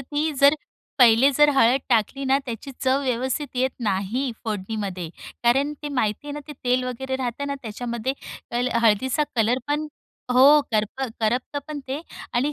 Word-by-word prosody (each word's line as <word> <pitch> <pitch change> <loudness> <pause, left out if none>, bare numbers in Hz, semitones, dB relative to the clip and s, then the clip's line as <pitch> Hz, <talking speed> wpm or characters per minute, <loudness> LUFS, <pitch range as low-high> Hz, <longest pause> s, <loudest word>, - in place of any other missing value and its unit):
ती 295 +4 -2
जर, 280 +2 +7 0.4
पहिले 245 +2 +6
जर 295 0 +6
हळद 260 +1 +4
टाकली 245 +3 +1
ना, 265 +1 +3
त्याची 235 +3 -6
चव 260 +1 +3
व्यवस्थित 260 +3 -1
येत 260 +1 +2
नाही, 215 +5 -1
फोडणीमध्ये. 200 -4 -4 0.4
कारण 270 +5 +3
ते 295 - -3
माहिती 250 -2 -1
आहे 290 - -5
ना, 295 - -5
ते 295 - -5
तेल 250 +1 +2
वगैरे 260 +1 -3
राहतं 260 +2 -3
ना, 280 - -2
त्याच्यामध्ये 235 +2 -3 0.4
पहिले 245 +1 0
हळदीचा 260 +7 +3
कलर 230 +3 +2
पण 300 +1 0 0.5
हो. 275 +4 +7
करप 215 +5 -1 0.2
करपतंपण 275 +6 -2
ते 270 +3 -3 0.3
आणि 275 +5 +1
255 Hz, 160 wpm, -24 LUFS, 230-280 Hz, 0.5 s, जर